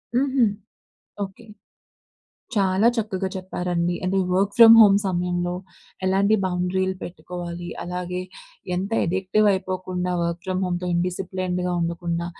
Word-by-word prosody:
హుహు. 265 -1 +3 0.8
ఓకె. 195 +4 -9 1.1
చాలా 195 0 +2
చక్కగా 200 -5 -2
చెప్పారండి. 180 -2 -2
అంటే 190 +1 +1
వర్క్ 195 +2 +1
ఫ్రమ్ 230 -1 +10
హోమ్ 200 -2 +7
సమయంలో, 175 -1 -1 0.5
ఎలాంటి 195 +3 +3
బౌండరీలు 185 +1 -1
పెట్టుకోవాలి, 175 0 -7
అలాగే 180 0 -4 0.5
ఎంత 190 +3 -2
ఎడిక్టివ్ 190 +4 +1
అయిపోకుండా 185 -1 -3
వర్క్ 170 0 -2
ఫ్రమ్ 185 0 -1
హోమ్‌తో 180 0 -2
ఇండిసిప్లీన్డ్‌గా 180 0 -2
ఉండకుండా, 170 0 -2
185 Hz, 105 wpm, -23 LUFS, 175-195 Hz, 1.1 s, ఫ్రమ్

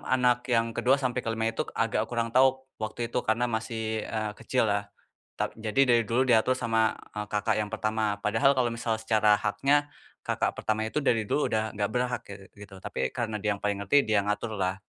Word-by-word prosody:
anak 125 -1 +2
yang 115 -2 +2
ke-2 130 +4 +3
sampai 125 -3 -1
ke-5 115 -1 -2
itu - - -5 0.2
agak 115 0 0
kurang 115 -1 -2
tahu 130 +1 +4 0.2
waktu 115 +2 -3
itu, - - +1
karena 110 +3 +2
masih, 110 -1 -3
eee, 110 -1 -2
kecil 120 +2 0
lah. 100 -1 0 0.5
Tap - - -2
jadi 110 +4 -1
dari 120 -1 +5
dulu 115 +4 0
diatur 120 +1 +4
sama, 115 -3 +1 0.2
eee, 105 - -2
kakak 105 +1 +1
yang 105 -1 -2
pertama, 110 -1 -1
padahal 110 +7 +3
kalau 130 -3 +1
misal 115 -1 -2
secara 110 -2 +3
haknya 145 +7 +1 0.3
kakak - - -1
pertama 110 0 -2
itu 110 +7 -1
dari 115 -6 +1
dulu 145 +8 0
udah 110 0 -1
nggak 100 -1 -1
berhak 125 +2 -1
ge 100 - -7 0.3
gitu, 100 -1 -11
tapi 65 -8 -3
karena 110 - -3
dia 105 -1 0
yang - - -18
paling 100 -1 0
ngerti, 120 +9 +3
dia 110 -2 +2
yang 100 - -5
ngatur 105 +2 -2
lah. 95 +1 -1
110 Hz, 205 wpm, -28 LUFS, 105-120 Hz, 0.5 s, dari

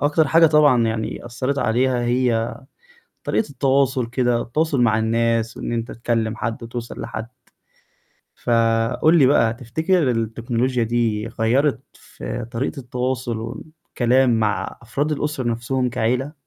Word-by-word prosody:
أكتر 150 +2 +2
حاجة 165 0 +6
طبعًا 150 -6 +4
يعني 110 +1 -3
أثرت 130 +4 -2
عليها 125 +1 +1
هي 120 -2 +1 0.7
طريقة 220 - 0
التواصل 135 -2 +1
كده، 120 -1 0
التواصل 150 +1 0
مع 110 -2 +3
الناس 115 0 0
وإن - - -4
أنت 115 0 -3
تكلم 115 -1 -1
حد، 115 +1 -3
توصل 120 0 -7
لحد 110 - -5 1.1
فقُل 115 +7 +2
لي 135 - +6
بقى 115 -4 +3
تفتكر 145 +5 0
التكنولوجيا 115 +2 -1
دي، 115 -2 0
غيَّرت 125 +5 +1
في - - -7
طريقة 135 +4 -3
التواصل 125 -2 -3
والكلام 125 0 0
مع 105 -1 -1
أفراد 140 +6 -2
الأسرة 150 -2 -2
نفسهم 125 +2 -1
كعيلة؟ 125 +4 -1
120 Hz, 130 wpm, -21 LUFS, 115-135 Hz, 1.1 s, حاجة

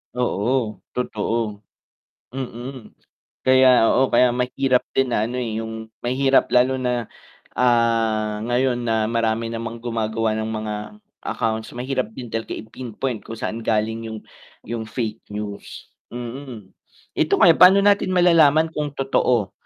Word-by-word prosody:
Oo, 120 -1 0 0.2
totoo, 110 -3 -2 0.7
mm, 125 -1 -7 0.5
kaya 130 -2 +6
oo, 130 +1 +3
kaya 125 -1 +4
mahirap 125 +1 0
din 130 -2 +2
na 110 0 +1
ano 125 - -5
eh, 115 -3 -2
'yung 110 0 -7
mahirap 135 +2 +2
lalo 130 +1 +3
na 125 -3 -2 0.4
ah, 115 -3 +1
ngayon 125 0 +1
na 115 -2 0
marami 115 0 0
namang 115 0 -6
gumagawa 115 -1 -1
ng 110 - -2
mga 110 -1 -3 0.5
accounts 110 0 -2
mahirap 130 -1 -2
din 120 -3 -8
talaga 115 0 -3
i-pinpoint 120 +1 -5
kung 115 - -6
saan 115 0 -4
galing 110 +1 0
'yung 110 -1 -6 0.4
'yung 115 -1 -5
fake 110 -2 -4
news. 105 -1 -7 0.2
Mm, 120 -4 -8 0.5
ito 155 - +2
kaya 190 -6 +7
paano 190 +2 +7
natin 200 -2 +3
malalaman 160 -3 +5
kung 150 -2 -4
totoo 125 -6 +1
120 Hz, 130 wpm, -22 LUFS, 110-130 Hz, 0.7 s, kaya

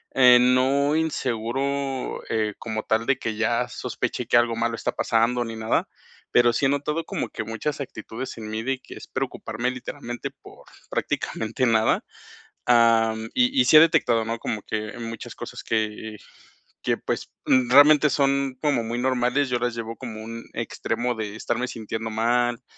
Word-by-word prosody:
eh, 125 -2 +8
no 130 +4 +3
inseguro, 135 -2 -2
eh, 110 -2 0
como 110 -1 -4
tal 110 +1 0
de 135 0 +1
que 110 -2 -3
ya 115 +2 +1
sospeche - - -4
que - - +4
algo 120 -1 +3
malo 115 0 -1
está - - -2
pasando 120 +2 +1
ni 115 -1 -6
nada, 110 0 0 0.4
pero 120 -1 +5
sí 135 - +2
he - - +1
notado 150 +3 -1
como - - -3
que - - -5
muchas 115 +7 -3
actitudes 120 -1 -7
en 110 -1 -7
mí 110 +1 -3
de 130 +1 -1
que - - -12
es - - -11
preocuparme, 125 +1 -3
literalmente, 125 -1 -6
por - - -16 0.2
prácticamente 115 +4 -2
nada, 110 -2 +3 0.6
am, 115 -2 +4
y 255 +2 +2
y 255 - +5
sí 155 - +7
he - - +12
detectado, 155 -8 +4
¿no?, 115 +1 -2
como 110 -2 -3
que 110 +1 -4
muchas 115 -1 -6
cosas - - -8
que, 110 -1 +1 0.3
eh, - - -11 0.7
que, - - +1
pues, - - -4
mm, 125 -2 +3
realmente 150 +2 +7
son 140 -1 +1
como 145 -6 +2
muy 115 +1 -3
normales, 130 +2 +1
yo 125 - +1
las 120 -1 -1
llevo 115 0 -5
como 110 -4 -7
un 115 +1 -7
extremo 125 0 -2
de 105 -2 -5
estarme 120 +3 -2
sintiendo 110 0 -5
mal, 120 +2 +1
120 Hz, 175 wpm, -24 LUFS, 115-135 Hz, 0.7 s, he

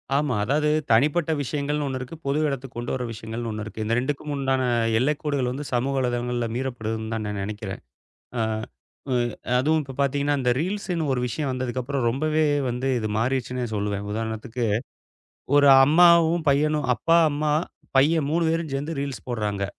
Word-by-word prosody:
ஆமா. 145 -3 +1
அதாவது 150 +6 +1 0.2
தனிப்பட்ட 150 +8 +3
விஷயங்கள்ன்னு 145 +2 -2
ஒண்ணு 130 -1 -3
இருக்கு. 130 +6 -7
பொது 140 +2 +1
இடத்துக்குக் 135 -3 -5
கொண்டு 120 - -3
வர 125 - -3
விஷயங்கள்ன்னு 115 +1 -5
ஒண்ணு 110 0 -4
இருக்கு. 110 0 -5
இந்த 115 +2 +1
2க்கும் 145 +3 -3
முண்டான 135 -1 0 0.4
எல்லைக் 145 +3 0
கோடுகள் 140 -5 0
வந்து 140 +3 -5
சமூக 130 +3 0
வலைதளங்கள்ல 120 -1 -1
மீறப்படுதுன்னுதான் 110 -3 -3
நான் 105 -1 -3
நெனைக்கிறேன். 105 -1 -5 0.6
ஆ - - +1 0.7
உ - - +2 0.4
அதுவும் 155 +5 +2
இப்ப 135 -2 -9
பாத்தீங்கன்னா 140 +1 +1
அந்த 125 -2 +1
ரீல்ஸ்ன்னு 180 -3 -2
ஒரு 125 - 0
விஷயம் 140 +3 -2
வந்ததுக்கு 130 0 -2
அப்பறம் 130 -1 -1
ரொம்பவே 155 +5 +1 0.3
வந்து 125 +2 -2
இது 110 -2 -2
மாறிச்சுன்னே 125 +1 -1
சொல்லுவேன். 100 -1 -2
உதாரணத்துக்கு, 110 +2 -3 0.9
ஒரு 145 -1 +6 0.2
அம்மாவும் 170 +1 +5
பையனும், 150 +1 +1
அப்பா, 165 +8 +3
அம்மா, 150 +1 0 0.5
பையன் 150 +1 +3
3 165 +2 +1
வேரும் 165 -1 -1
சேந்து 145 +3 -3
ரீல்ஸ் 140 -2 -5
போடுறாங்க. 105 -4 -2
135 Hz, 160 wpm, -24 LUFS, 120-150 Hz, 0.9 s, ஒரு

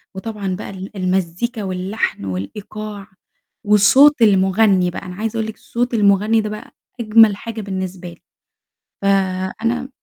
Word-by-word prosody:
وطبعًا 200 -2 -4
بقى 195 - -7
ال 195 +2 -9
المزيكا 190 +5 -2
واللحن 185 - -3
والإيقاع، 200 - -6 0.6
والصوت 235 +7 +5
المُغني 190 -2 +3
بقى، - - -6
أنا 180 0 -8
عايزة 220 +3 -3
أقول 220 -1 -1
لِك 220 - -9
صوت 245 +1 -3
المُغني 210 +1 +3
ده 215 - -4
بقى 210 0 -8 0.3
أجمل 220 -2 +5
حاجة 225 +1 -7
بالنسبة 190 -2 -5
لي. 170 - -15 0.8
فأنا 195 +6 -1
200 Hz, 130 wpm, -19 LUFS, 185-220 Hz, 0.8 s, والصوت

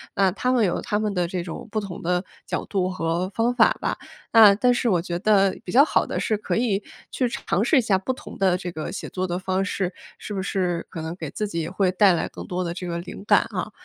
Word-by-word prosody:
那 195 -1 +4
他 250 +4 0
们 245 -4 +3
有 175 - 0
他 210 - -1
们 210 -2 -1
的 180 -2 +1
这 180 0 -3
种 170 +5 -7
不 215 - 0
同 195 -4 -7
的 180 +2 0 0.2
角 - - -2
度 185 -2 -1
和 175 +1 -1
方 235 +2 +1
法 - - +5
吧。 - - -1 0.3
那 220 -3 +9
但 245 +5 +3
是 240 0 0
我 175 -4 +2
觉 175 -1 -3
得 195 -1 +3
比 180 - -5
较 275 - +7
好 - - +2
的 - - -3
是 215 - 0
可 - - -2
以 220 -4 0 0.3
去 255 - 0
尝 205 -4 -1
试 275 -1 +5
一 - - +3
下 205 -4 +2
不 255 +7 -2
同 - - -11
的 190 -2 +3
这 180 -1 -5
个 155 -2 -5
写 200 - -6
作 185 0 -2
的 175 0 -2
方 190 +1 -1
式， 190 -2 -2 0.3
是 205 - -6
不 190 - -2
是 180 -3 -1
可 160 - -5
能 160 +2 -5
给 160 -5 -6
自 210 - -2
己 170 -4 -3
也 160 - -2
会 190 -1 +1
带 190 -1 +5
来 170 - -1
更 - - -9
多 180 0 -2
的 170 0 -4
这 180 - -5
个 170 -1 -3
灵 180 +3 -9
感 - - +6
啊。 - - -4
190 Hz, 285 characters per minute, -24 LUFS, 175-210 Hz, 0.3 s, 那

